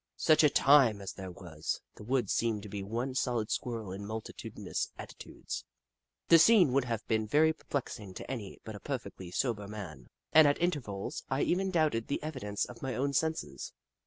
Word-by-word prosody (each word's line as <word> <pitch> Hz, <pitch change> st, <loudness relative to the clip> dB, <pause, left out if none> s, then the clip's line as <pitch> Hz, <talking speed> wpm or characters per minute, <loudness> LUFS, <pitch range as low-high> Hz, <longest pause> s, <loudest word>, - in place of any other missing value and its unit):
Such 155 Hz, 0 st, +5 dB
a 150 Hz, -, +7 dB
time 135 Hz, -7 st, +5 dB
as 100 Hz, -, -6 dB
there 95 Hz, -1 st, -7 dB
was! 85 Hz, -4 st, -5 dB
The -, -, -12 dB
woods 120 Hz, -2 st, 0 dB
seemed 110 Hz, -3 st, 0 dB
to 105 Hz, -, -8 dB
be 100 Hz, 0 st, -4 dB
one 120 Hz, +6 st, -3 dB
solid 120 Hz, -4 st, 0 dB
Squirrel 115 Hz, -6 st, -3 dB
in 95 Hz, +2 st, -6 dB
multitudi 110 Hz, +2 st, -7 dB
nous -, -, -2 dB
attitudes. -, -, -7 dB, 0.6 s
The 165 Hz, -, +8 dB
scene 180 Hz, -, +6 dB
would 135 Hz, -1 st, +3 dB
have 115 Hz, -2 st, -3 dB
been 110 Hz, -1 st, +1 dB
very 155 Hz, +7 st, +4 dB
perplexing 115 Hz, -10 st, -5 dB
to -, -, -7 dB
any 110 Hz, -7 st, -5 dB
but 110 Hz, -, -7 dB
a -, -, -8 dB
perfectly 125 Hz, -9 st, -5 dB
sober 105 Hz, +1 st, -1 dB
man, 90 Hz, -, -8 dB, 0.3 s
and 155 Hz, -1 st, +8 dB
at 145 Hz, -, +2 dB
intervals 135 Hz, -, -2 dB
I 135 Hz, +1 st, +1 dB
even 190 Hz, +2 st, +1 dB
doubted 155 Hz, -10 st, +1 dB
the 140 Hz, -, -1 dB
evi 155 Hz, -3 st, -4 dB
dence 105 Hz, -3 st, -2 dB
of 120 Hz, -, -12 dB
my 130 Hz, -3 st, -3 dB
own 140 Hz, +3 st, 0 dB
senses. 160 Hz, -, -2 dB
115 Hz, 190 wpm, -31 LUFS, 105-145 Hz, 0.6 s, The